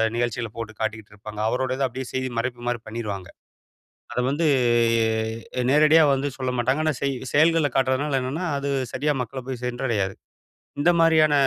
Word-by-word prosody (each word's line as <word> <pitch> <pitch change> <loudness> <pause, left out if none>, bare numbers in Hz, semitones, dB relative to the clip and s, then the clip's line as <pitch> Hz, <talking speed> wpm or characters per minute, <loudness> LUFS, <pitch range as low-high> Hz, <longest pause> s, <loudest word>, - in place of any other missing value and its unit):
நிகழ்ச்சிகள 120 -1 -1
போட்டுக் 110 -2 -7
காட்டிக்கிட்டு 110 -1 -4
இருப்பாங்க. 105 +1 -9
அவரோடது 130 +2 0
அப்பிடியே 130 +1 -6
செய்தி 130 0 -1
மறைப்புமாரி 120 -1 -3
பண்ணிருவாங்க. 105 -5 -5 0.8
அத - - 0
வந்து 155 +4 +1 0.6
எ - - +3 0.6
அ - - +1
நேரடியா 155 +3 +6
வந்து 135 +1 -1
சொல்லமாட்டாங்க. 130 +2 0
ஆனா, 155 - +2
செய் 140 -1 +1 0.2
செயல்கள்ல 155 0 +4
காட்டுறதுனால 135 +1 +1
என்னன்னா, 150 +8 -3
அது 140 0 -2 0.2
சரியா 150 +2 0
மக்கள 130 +2 -6
போய் 125 -2 -5
சென்றடையாது. 120 -6 -1 0.7
இந்த 165 - +4
மாதிரியான 160 -2 +5
130 Hz, 145 wpm, -24 LUFS, 115-145 Hz, 0.8 s, நேரடியா